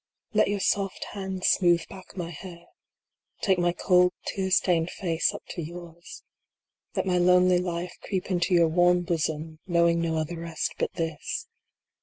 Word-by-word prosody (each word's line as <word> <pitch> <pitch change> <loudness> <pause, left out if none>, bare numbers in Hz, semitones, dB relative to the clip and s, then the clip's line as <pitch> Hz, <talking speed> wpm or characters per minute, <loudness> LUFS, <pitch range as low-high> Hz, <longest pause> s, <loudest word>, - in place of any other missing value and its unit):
Let 215 - +4
your 205 0 -1
soft 195 0 0
hands 190 -2 -4
smooth 175 -2 +3
back 190 -1 -13
my 170 -1 -4
hair. 170 +1 -10 0.8
Take 190 -3 +2
my 175 0 +2
cold, 180 0 +3
tear 190 -1 -2
stained 175 -2 +2
face 170 -4 0
up - - -9
to 175 - -5
yours. 170 +1 -10 0.7
Let - - 0
my 180 -1 +2
lonely 180 0 +5
life 175 0 -3
creep 190 -1 -3
into 180 0 +2
your 170 -1 +5
warm 175 +2 +3
bosom, 160 -2 -2
know 170 -1 +3
ing 170 0 +2
no 165 -1 -1
other 160 +2 -3
rest 165 -1 -3
but - - -1
this. 165 -2 -3
175 Hz, 165 wpm, -26 LUFS, 170-185 Hz, 0.8 s, lonely